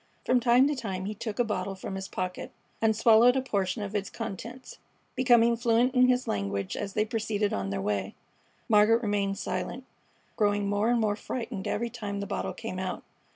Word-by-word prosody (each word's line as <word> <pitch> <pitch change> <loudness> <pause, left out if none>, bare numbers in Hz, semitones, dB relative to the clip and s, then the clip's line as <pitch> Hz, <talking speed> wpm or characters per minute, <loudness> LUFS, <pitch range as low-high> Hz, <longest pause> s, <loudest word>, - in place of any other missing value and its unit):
From 250 - +3
time 245 +3 +5
to 295 - 0
time 195 -7 -4
he 210 - -3
took 215 0 -5
a 245 - +3
bottle 195 -3 -3
from 190 - -7
his 190 0 -5
pocket 185 0 -4 0.3
and 220 -1 +3
swallowed 230 +3 +6
a 265 - +2
portion 200 -4 -1
of 200 0 -6
its 200 -2 -2
contents, 235 +6 -7 0.4
becoming 235 -2 +4
fluent 235 +2 +2
in 255 -1 +5
his 250 0 +1
language 100 -1 -2
as 200 -1 -4
they 215 0 +1
proceeded 220 -2 -1
on 100 0 -2
their 100 0 -2
way. 100 -1 -2 0.5
Margaret 225 +2 +4
remained 200 -2 0
silent, 190 +9 -4 0.5
growing 205 -2 +2
more 205 +3 +1
and 240 -1 +3
more 210 -2 +1
frightened 225 -4 -5
every 235 +2 -2
time 205 -4 -5
the 200 - -3
bottle - - -3
came 220 -5 -6
out. 185 -1 -4
210 Hz, 195 wpm, -28 LUFS, 195-235 Hz, 0.5 s, swallowed